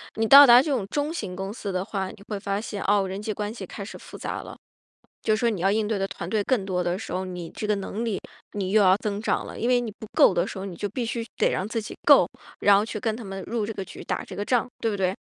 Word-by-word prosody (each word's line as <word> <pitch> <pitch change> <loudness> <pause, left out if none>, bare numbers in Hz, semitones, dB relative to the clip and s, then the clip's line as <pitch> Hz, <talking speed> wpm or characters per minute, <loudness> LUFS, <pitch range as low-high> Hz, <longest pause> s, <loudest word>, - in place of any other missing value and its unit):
你 225 - +1
到 280 +5 +10
达 240 +1 +8
这 300 - -2
种 250 -7 0
中 295 +5 -1
型 195 - -4
公 195 +2 -4
司 210 -4 -5
的 185 0 -2
话， 195 -2 -3
你 - - -10
会 205 -2 -4
发 200 0 -2
现， 210 -2 -5
哦， 200 -1 +3
人 190 +2 -5
际 215 - -3
关 210 +1 -3
系 200 -5 -8
开 200 - -7
始 - - -9
复 - - -11
杂 - - -4
了。 - - -10 0.6
就 215 - +2
说 235 +2 +1
你 210 -5 -3
要 190 +3 +2
应 215 0 +1
对 215 -1 0
的 195 0 -1
团 175 -2 -7
队 215 -1 +1
更 235 -2 +1
多 180 -2 0
的 175 +2 -1
时 225 - -7
候， 185 +1 -2
你 180 -2 -6
这 - - -6
个 210 - +2
能 205 +3 -4
力 215 -4 -2 0.3
你 195 -2 -3
又 215 +3 +4
要 190 -2 +6
增 205 -1 -3
长 220 - 0
了， - - -8
因 235 - 0
为 245 -1 +4
你 235 - -4
不 215 +1 -10
够 185 - +5
的 175 - +2
时 - - -6
候， 190 - -5
你 190 -3 -6
就 205 - -3
必 225 +5 -3
须 230 0 -3
得 - - +3
让 185 - -2
自 225 +1 -2
己 210 - -8
够， - - +7 0.3
然 200 -1 +6
后 205 - +1
去 220 -1 -5
跟 220 +1 -1
他 235 - -8
们 195 -1 -6
入 230 -2 -1
这 220 - -4
个 195 - -4
局， 170 - -10
打 - - -2
这 - - -9
个 205 - -3
仗， 245 0 +2
对 225 - 0
不 - - -2
对？ 190 -1 0
205 Hz, 330 characters per minute, -25 LUFS, 195-225 Hz, 0.6 s, 到